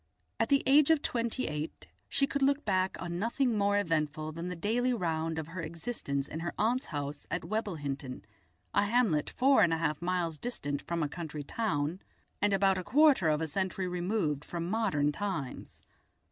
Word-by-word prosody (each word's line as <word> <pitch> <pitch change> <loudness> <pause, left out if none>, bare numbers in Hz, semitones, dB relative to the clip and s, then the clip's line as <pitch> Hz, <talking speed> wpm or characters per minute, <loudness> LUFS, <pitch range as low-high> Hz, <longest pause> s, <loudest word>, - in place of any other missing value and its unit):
At - - +1
the 280 -1 +4
age 280 +2 +6
of 320 -2 +4
twenty 235 +1 -1
eight 150 +1 -4 0.2
she 275 - +3
could 280 +1 -3
look 280 +2 +2
back 190 -2 +1
on 175 0 -4
nothing 235 +3 +1
more 205 0 +2
eventful 155 -4 0
than 165 +3 -5
the 180 - -4
daily 235 +8 +1
round 160 -4 -1
of 160 0 -4
her 180 +1 -5
existence 160 - -3
in 160 - -5
her 170 +1 -4
aunt's 245 +5 +1
house 145 0 -5
at 175 - -2
Webblehinton, 145 - -3 0.5
a 205 - +3
hamlet 205 -9 +2
four 270 +2 +4
and 170 - +5
a 165 - +2
half 155 -1 -1
miles 175 -3 -1
distant 145 - -3
from 170 -1 -2
a - - +1
country 155 -1 -6
town 165 -3 -1 0.4
and 205 0 +3
about 195 -1 +3
a - - -4
quarter 265 - +5
of 150 0 +1
a - - +1
century 185 +3 -2
removed 175 -5 -1
from 170 +1 -4
modern 150 -10 +2
times. 175 -7 -5
180 Hz, 185 wpm, -31 LUFS, 155-225 Hz, 0.5 s, age